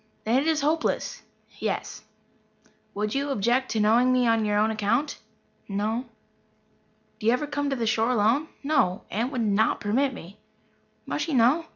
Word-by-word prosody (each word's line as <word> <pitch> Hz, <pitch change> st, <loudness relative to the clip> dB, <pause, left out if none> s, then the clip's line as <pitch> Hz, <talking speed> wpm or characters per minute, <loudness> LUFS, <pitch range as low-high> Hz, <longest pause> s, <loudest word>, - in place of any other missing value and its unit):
"Then 235 Hz, +4 st, +2 dB
it 300 Hz, -, -2 dB
is 315 Hz, -2 st, +2 dB
hopeless." 310 Hz, +3 st, -1 dB, 0.4 s
"Yes." -, -, -3 dB, 0.9 s
"Would 210 Hz, +1 st, -2 dB
you 280 Hz, +1 st, -1 dB
object 250 Hz, +2 st, +1 dB
to 220 Hz, -, -1 dB
knowing 230 Hz, +4 st, +4 dB
me 255 Hz, -1 st, +3 dB
on 225 Hz, -1 st, +2 dB
your 205 Hz, 0 st, +1 dB
own 215 Hz, +1 st, +2 dB
account?" 220 Hz, +7 st, -1 dB, 0.5 s
"No." 215 Hz, +5 st, -1 dB, 1.1 s
"Do 215 Hz, -, -3 dB
you 230 Hz, -, +5 dB
ever 250 Hz, +4 st, -1 dB
come 290 Hz, -1 st, -2 dB
to 275 Hz, -, -1 dB
the 235 Hz, -3 st, -2 dB
shore 225 Hz, +1 st, +1 dB
alone?" 245 Hz, +6 st, +2 dB, 0.2 s
"No. 235 Hz, -9 st, +1 dB
Aunt 235 Hz, +6 st, -1 dB
would 255 Hz, -4 st, -2 dB
not 215 Hz, 0 st, +2 dB
permit 260 Hz, +7 st, +1 dB
me." 195 Hz, -5 st, -11 dB, 0.7 s
"Must -, -, -2 dB
she 320 Hz, -4 st, -2 dB
know?" 260 Hz, +8 st, +4 dB
235 Hz, 170 wpm, -26 LUFS, 215-275 Hz, 1.1 s, you